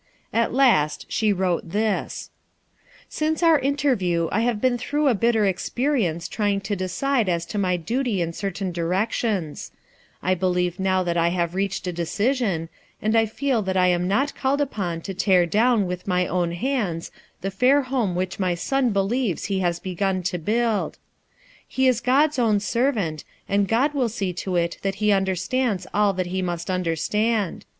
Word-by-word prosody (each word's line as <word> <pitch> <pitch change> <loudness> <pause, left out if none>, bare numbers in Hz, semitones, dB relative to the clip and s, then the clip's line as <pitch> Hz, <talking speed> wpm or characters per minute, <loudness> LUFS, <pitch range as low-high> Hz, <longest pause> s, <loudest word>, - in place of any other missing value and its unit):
At 230 0 +2
last 235 - +3
she 215 -1 +1
wrote 180 -3 -1
this: 210 +2 -2 0.4
— - - -41 0.3
"Since 310 +2 -1
our 325 -3 +6
interview 255 - +1
I 215 - +1
have 235 -2 0
been 245 +1 +1
through 290 +4 0
a 265 - +5
bitter 225 0 +2
experience 190 - 0
trying 205 -2 0
to 200 +1 -2
decide 210 +5 0
as 170 -1 0
to 210 - -4
my 180 -2 +1
duty 230 +4 -1
in 170 -1 -1
certain 195 0 -3
directions, 180 0 -1 0.5
I 185 - +2
believe 180 0 0
now 190 -1 +1
that 175 -1 -1
I 170 0 +3
have 170 -1 -1
reached 195 0 -2
a 180 - -2
decision, 200 0 -1 0.3
and 215 +1 0 0.2
feel 265 -2 0
that 190 -1 -1
I 180 0 +4
am 180 0 +1
not 270 +9 +1
called 275 +1 0
upon 190 - -2
to 195 - -5
tear 185 -1 +3
clown 215 +4 +2
with 180 +1 -5
my 180 -1 +2
own 175 -1 -1
hands 205 -6 -2 0.3
the 195 - -3
fair 260 +8 +3
home 245 -8 -1
which 185 +2 -3
my 180 -2 +1
son 265 +8 0
believes 200 0 0
he 195 -2 -1
has 175 -2 0
begun 185 +1 -2
to 180 0 -2
build. 220 +4 0 0.7
He 265 0 +1
is 245 -2 +2
God's 285 +3 +3
own 220 -4 +3
servant, 210 - -1 0.2
and 200 0 +1
God 260 +8 +2
mil 260 -5 +1
see 195 -5 -3
to 185 +1 -3
it 170 -1 0
that 195 -1 -1
he 210 0 +1
understands 195 +2 0
all 205 -1 +3
that 185 -1 -2
he 190 - 0
must 175 0 -3
understand. 185 +5 -1
195 Hz, 175 wpm, -23 LUFS, 180-240 Hz, 0.7 s, our